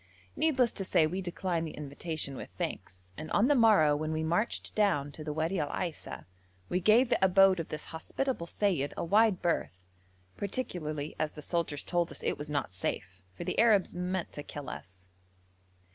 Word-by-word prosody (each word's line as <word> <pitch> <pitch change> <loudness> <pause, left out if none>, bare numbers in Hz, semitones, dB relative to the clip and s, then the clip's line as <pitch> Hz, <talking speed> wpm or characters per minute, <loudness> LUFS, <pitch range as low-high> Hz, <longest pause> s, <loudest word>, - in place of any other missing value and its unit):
Needless 260 -7 +2
to 195 - -2
say 165 -3 +3
we 180 +5 -2
declined 175 -2 -2
the - - -9
invitation 150 0 -3
with - - -7
thanks, 90 -1 -5
and 155 +1 -6
on 210 +4 +4
the 290 - +5
morrow 210 - +5
when 155 +1 -2
we 160 0 -1
marched 175 +8 0
down 145 -10 +1
the 155 -1 -5
Wadi 160 +5 -1
Al 145 -2 -1
Aisa 170 -1 -4 0.4
we 180 - +1
gave 220 +7 +5
the - - +2
abode 190 0 +6
of 165 - -4
this 150 - -5
hospitable 170 +4 -3
seyyid 170 -8 0
a - - -1
wide 210 +2 +3
berth, 90 - -1 0.5
particularly 155 - -3
as 155 - -1
the 150 - -9
soldiers 165 -4 -1
told 175 -1 0
us - - -7
it - - -1
was 150 +1 -5
not 145 -10 -2
safe, 95 0 -4
for - - -6
the - - -2
Arabs 215 -5 +4
meant 180 0 -2
to 145 - -5
kill 145 -2 -7
us. 95 0 -9
165 Hz, 185 wpm, -31 LUFS, 150-195 Hz, 0.5 s, abode